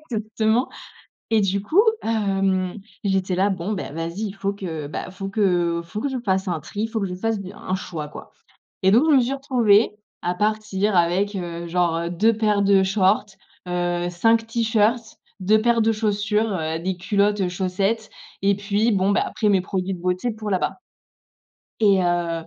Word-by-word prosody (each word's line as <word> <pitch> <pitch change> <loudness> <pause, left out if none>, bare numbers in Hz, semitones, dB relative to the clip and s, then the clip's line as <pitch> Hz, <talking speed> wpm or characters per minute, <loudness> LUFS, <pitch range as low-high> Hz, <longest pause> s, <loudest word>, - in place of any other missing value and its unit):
exactement. 220 +2 0 0.6
Et 220 -2 +3
du 195 0 0
coup, 315 - +2 0.2
hem, 195 -3 0 0.2
j'étais 190 -2 0
là: 195 +2 +2
«Bon 190 +3 -3
beh, 185 - -5
vas-y, 165 +5 -4
il - - -8
faut 195 0 -2
que, 165 -7 -5
bah, - - -5
il - - -10
faut 195 +1 -6
que 175 -5 +1
faut 210 +6 -6
que 280 - -1
je 265 - -3
fasse 190 -1 0
un 170 -3 -1
tri, 210 +8 -4
faut 225 -1 -3
que - - 0
je 180 - -4
fasse 220 +3 -1
de 190 -1 -7
un 185 - -3
choix, 160 -5 -5
quoi.». 150 - -11 0.5
Et 190 - +5
donc 295 +8 +5
je 285 - +6
me - - +6
suis 245 +3 0
retrouvée 240 -6 +3 0.3
à 180 0 -1
partir 210 -1 0
avec, 185 +4 +2
heu, 170 -2 -5
genre, 170 -1 +1
heu, 170 0 -3
2 215 +6 +3
paires 210 -2 +2
de 195 -1 +4
shorts, 195 +1 +2 0.4
heu, 175 0 -1
5 225 +6 +2
t-shirts, 225 0 0 0.2
2 215 +4 +3
paires 235 0 +3
de 225 - +3
chaussures, 210 0 0
heu, 160 -2 -2
des 185 +1 -2
culottes, 200 +2 +1
heu, 180 - +1
chaussettes, 195 +4 -1 0.3
et 200 0 +3
puis 205 +3 +1
bon, 195 0 +2
bah, - - +2
après 215 - -1
mes 195 -2 +4
produits 190 +1 -3
de 175 - -10
beauté 180 +6 -1
pour 215 -1 -6
là-bas. 185 -2 -1 1.0
Et 200 -3 +5
heu 170 -2 -1
195 Hz, 190 wpm, -22 LUFS, 180-215 Hz, 1.0 s, je